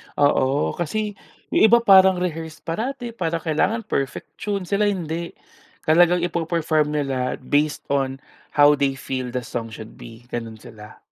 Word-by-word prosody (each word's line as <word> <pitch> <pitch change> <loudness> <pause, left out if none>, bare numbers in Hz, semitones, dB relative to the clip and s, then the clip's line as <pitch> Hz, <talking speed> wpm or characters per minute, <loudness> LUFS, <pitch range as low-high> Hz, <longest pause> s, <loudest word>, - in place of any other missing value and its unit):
Oo, 145 -1 +2
kasi 205 +5 -3 0.3
'yong 220 - +5
iba 235 +2 +6
parang 190 -2 +7
rehearsed 160 -2 -4
parati, 240 +7 -4
para 170 -6 -2
kailangan 195 +8 0
perfect 135 -9 -3
tune. 200 -2 -2
Sila 205 +3 +1
hindi, 170 -3 -3 0.5
talagang 175 +2 +4
ipe-perform 165 -3 0
nila 135 -3 -1
based 145 +3 0
on 135 -1 0 0.4
how 145 0 +6
they 135 -1 +1
feel 130 -1 -4
the 125 -1 -2
song 115 -1 -5
should 110 0 -11
be. 115 +1 -12
Gano'n 115 -2 -5
sila. 105 -1 -13
155 Hz, 145 wpm, -22 LUFS, 135-185 Hz, 0.5 s, parang